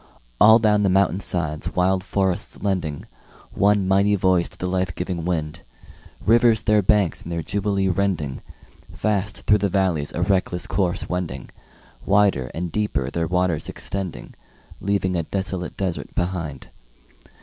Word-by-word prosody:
All 110 +1 +8
down 105 -2 +3
the 100 - +2
mountain 95 -1 +2
sides 80 -6 -1
wild 95 +1 +2
forests 95 -1 -2
lending 90 -8 -2 0.5
One 100 -1 +2
mighty 100 +2 +3
voice 90 -2 +2
to - - -16
the - - -4
life 90 -1 -1
giving 90 -2 -4
wind, 80 -2 -2 0.6
Rivers 115 0 +4
their 105 -1 +3
banks 100 -2 +2
in - - -9
their 85 -1 -3
jubilee 100 -1 -1
rending, 90 -7 -1 0.5
Fast 105 -1 -2
through 105 0 +4
the 100 0 0
valleys 90 -7 0
a 85 - -1
reckless 90 -2 0
course 90 -3 -1
wending, 90 -7 -4 0.5
Wider 100 -11 +2
and 85 +1 -3
deeper 70 -12 -1
their 85 +1 -1
waters 90 -2 0
extending, 95 -3 -5 0.5
Leaving 95 -2 0
a 85 - +1
desolate 95 0 -4
desert 95 -4 -4
behind. 85 -7 -3
95 Hz, 145 wpm, -22 LUFS, 85-100 Hz, 0.6 s, All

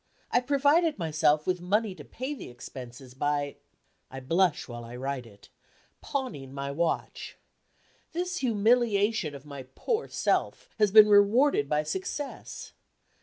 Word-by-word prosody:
I - - +4
provided 285 +5 +3
myself 155 -3 +2
with 180 -1 -1
money 205 +3 0
to - - -11
pay 260 +4 -5
the 285 - -9
expenses 125 +1 -10
by 145 +1 -1 0.5
I 135 - -7
blush 165 +4 +1
while 120 -1 -7
I 115 +1 -9
write 130 -1 -4
it 100 -2 -18 0.5
pawning 250 - -4
my 140 0 -3
watch. 165 +3 -2 0.7
This 360 +2 -2
humiliation 220 - +2
of 140 +1 -11
my 140 -3 -9
poor 465 -2 -1
self - - -1
has 210 -1 +4
been 215 +1 +9
rewarded 205 - +4
by 150 0 +1
success. 190 - -5
180 Hz, 135 wpm, -28 LUFS, -, 0.7 s, been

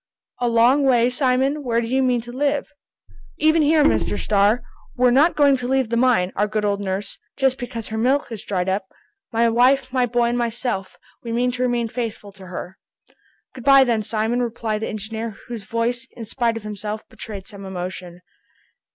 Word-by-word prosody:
"A 245 - +1
long 240 +5 +4
way, 245 -2 +3
Simon? 265 +3 +1
Where 235 -3 +1
do 235 - -2
you 260 +3 +1
mean 250 -2 +2
to 240 +1 -10
live?" 285 +3 -1 0.7
"Even 315 +1 +3
here, 305 0 +4
Mr. 205 - +2
Starr! 210 +4 +2 0.3
We're 250 0 +4
not 295 +7 +4
going 285 -2 +5
to 245 -1 -4
leave 265 -2 +1
the 235 - 0
mine, 235 -7 +2
our 205 +1 +1
good 215 0 -1
old 200 0 0
nurse, 195 +1 -4 0.2
just 265 -1 +1
because 235 -3 -6
her 220 0 -3
milk 260 +3 +1
is 225 - -6
dried 185 -2 -2
up! 190 +1 -1 0.4
My 230 0 +3
wife, 255 +3 +3
my 250 -2 +2
boy, 240 0 +1
and 240 - -1
myself, 235 -4 -3 0.2
we 235 - -6
mean 245 +2 +1
to 250 0 -5
remain 240 -2 +1
faithful 220 -3 -5
to 190 -1 -13
her!" 180 +1 -7 0.7
"Good 255 - -10
by 275 +1 +7
then, 235 -4 +1
Simon," 220 +3 -1
replied 225 -2 -2
the - - -2
engineer, 220 +1 -5
whose 230 -5 -7
voice, 235 +2 -2
in 230 - -8
spite 230 0 -1
of 225 - -8
himself, 210 0 -6
betrayed 200 -3 -9
some 200 -1 -11
emotion. 180 -1 -6
235 Hz, 195 wpm, -22 LUFS, 210-255 Hz, 0.7 s, by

